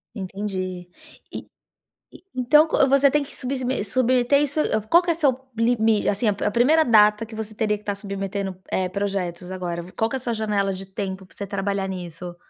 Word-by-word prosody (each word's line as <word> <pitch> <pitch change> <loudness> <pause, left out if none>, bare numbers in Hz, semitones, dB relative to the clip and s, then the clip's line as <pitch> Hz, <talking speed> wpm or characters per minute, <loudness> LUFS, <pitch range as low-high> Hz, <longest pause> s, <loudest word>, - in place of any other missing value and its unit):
Entendi. 185 -2 -5 0.4
E - - -7 0.7
e - - -15
então 300 +5 +5
co 280 - +3
você 275 +1 +5
tem 295 +1 +1
que - - -9
subsme 260 -3 -2
submeter 250 +4 +2
isso 290 +2 0 0.3
qual 345 +7 +6
que 350 - -4
é 335 - +2
seu 285 -6 +2 0.2
limi 225 -2 +2
assim, 205 +3 +1
a 205 0 0
primeira 300 +8 +4
data 210 -1 +5
que 225 - -14
você 220 0 -6
teria 215 -1 0
que 210 - -11
estar 205 -1 -3
submetendo, 195 -1 -4 0.2
eh, 185 -1 0
projetos 185 -2 -3
agora, 175 -2 -4
vi 180 +2 -12
qual 225 - 0
que - - -2
é - - -6
sua 240 -2 -2
janela 205 -2 0
de 190 +1 -6
tempo 190 0 -5
pra - - -16
você 200 - -5
trabalhar 195 0 -2
nisso? 175 -1 -7
210 Hz, 195 wpm, -23 LUFS, 190-250 Hz, 0.7 s, qual